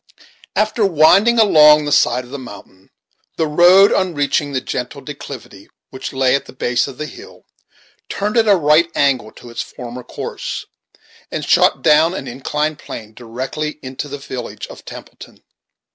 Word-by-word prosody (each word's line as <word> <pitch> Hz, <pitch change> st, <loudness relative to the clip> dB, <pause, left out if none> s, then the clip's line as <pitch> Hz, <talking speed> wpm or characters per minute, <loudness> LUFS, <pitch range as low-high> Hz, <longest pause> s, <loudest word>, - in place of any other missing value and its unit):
After 215 Hz, +1 st, +1 dB
winding 195 Hz, +6 st, +4 dB
along 150 Hz, -8 st, +6 dB
the 145 Hz, -, -3 dB
side 125 Hz, -3 st, +3 dB
of 125 Hz, -, -15 dB
the 140 Hz, -, -6 dB
mountain, 100 Hz, -5 st, -13 dB, 0.5 s
the 160 Hz, -, 0 dB
road, 175 Hz, +6 st, +6 dB
on 185 Hz, -3 st, 0 dB
reaching 145 Hz, 0 st, 0 dB
the 130 Hz, -, -1 dB
gentle 125 Hz, +2 st, -5 dB
declivity 140 Hz, -9 st, -10 dB, 0.2 s
which 130 Hz, -, -6 dB
lay 130 Hz, -1 st, +1 dB
at 140 Hz, -, 0 dB
the -, -, -13 dB
base 120 Hz, -2 st, 0 dB
of -, -, -10 dB
the 150 Hz, -, -4 dB
hill, 400 Hz, -, -13 dB, 0.6 s
turned 210 Hz, +2 st, -3 dB
at 225 Hz, -2 st, +3 dB
a 205 Hz, -, +6 dB
right 160 Hz, 0 st, +3 dB
angle 130 Hz, -6 st, +1 dB
to 120 Hz, -, -13 dB
its 115 Hz, -, -4 dB
former 125 Hz, 0 st, -8 dB
course, -, -, -6 dB, 0.6 s
and -, -, -4 dB
shot -, -, +3 dB
down 160 Hz, +4 st, +4 dB
an 135 Hz, -, -6 dB
inclined 150 Hz, +5 st, -3 dB
plane, 110 Hz, -1 st, -9 dB
directly 130 Hz, +7 st, -5 dB
into 130 Hz, +2 st, -6 dB
the 145 Hz, 0 st, -6 dB
village 130 Hz, -4 st, -7 dB
of -, -, -13 dB
Templeton. -, -, -12 dB
145 Hz, 165 wpm, -18 LUFS, 125-165 Hz, 0.6 s, along